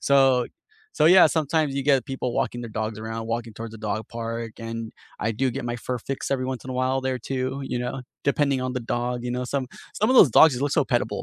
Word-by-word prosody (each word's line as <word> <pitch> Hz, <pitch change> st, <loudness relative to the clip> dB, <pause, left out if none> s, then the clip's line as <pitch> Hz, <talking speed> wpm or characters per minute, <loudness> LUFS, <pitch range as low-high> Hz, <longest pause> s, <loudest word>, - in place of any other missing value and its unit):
So 135 Hz, -3 st, +4 dB, 0.5 s
so 155 Hz, -, +5 dB
yeah, 180 Hz, 0 st, +8 dB
sometimes 155 Hz, -2 st, 0 dB
you 140 Hz, -, -1 dB
get 135 Hz, -3 st, +3 dB
people 130 Hz, -3 st, -3 dB
walking 120 Hz, -, -1 dB
their 115 Hz, -, -7 dB
dogs 110 Hz, 0 st, -3 dB
around, 110 Hz, 0 st, -5 dB
walking 115 Hz, 0 st, -3 dB
towards 115 Hz, 0 st, -7 dB
the 110 Hz, -, -10 dB
dog 110 Hz, +1 st, -1 dB
park 115 Hz, 0 st, -4 dB, 0.2 s
and 115 Hz, -1 st, -5 dB, 0.3 s
I 115 Hz, -, +1 dB
do 130 Hz, +5 st, 0 dB
get 120 Hz, -, -5 dB
my 120 Hz, -, -3 dB
fur 125 Hz, -1 st, -2 dB
fix 135 Hz, +4 st, -5 dB
every 130 Hz, -2 st, 0 dB
once 130 Hz, -, -5 dB
in 130 Hz, -, -6 dB
a -, -, -4 dB
while, 130 Hz, +1 st, +1 dB
there 130 Hz, -1 st, -2 dB
too, 130 Hz, +1 st, -3 dB
you 120 Hz, -, 0 dB
know, 125 Hz, +1 st, -4 dB, 0.3 s
depending 140 Hz, -2 st, +2 dB
on 130 Hz, 0 st, -3 dB
the 125 Hz, -, -2 dB, 0.2 s
dog, 125 Hz, +1 st, -1 dB
you 120 Hz, -, -2 dB
know, 125 Hz, -, -2 dB
some 135 Hz, -2 st, 0 dB, 0.3 s
some 215 Hz, -, +2 dB
of 260 Hz, -, +4 dB
those 145 Hz, -, +8 dB
dogs 160 Hz, -5 st, +8 dB
you 125 Hz, -, -4 dB
look 145 Hz, -, 0 dB
so -, -, +4 dB
pet-able, -, -, 0 dB
130 Hz, 250 wpm, -24 LUFS, 115-135 Hz, 0.5 s, yeah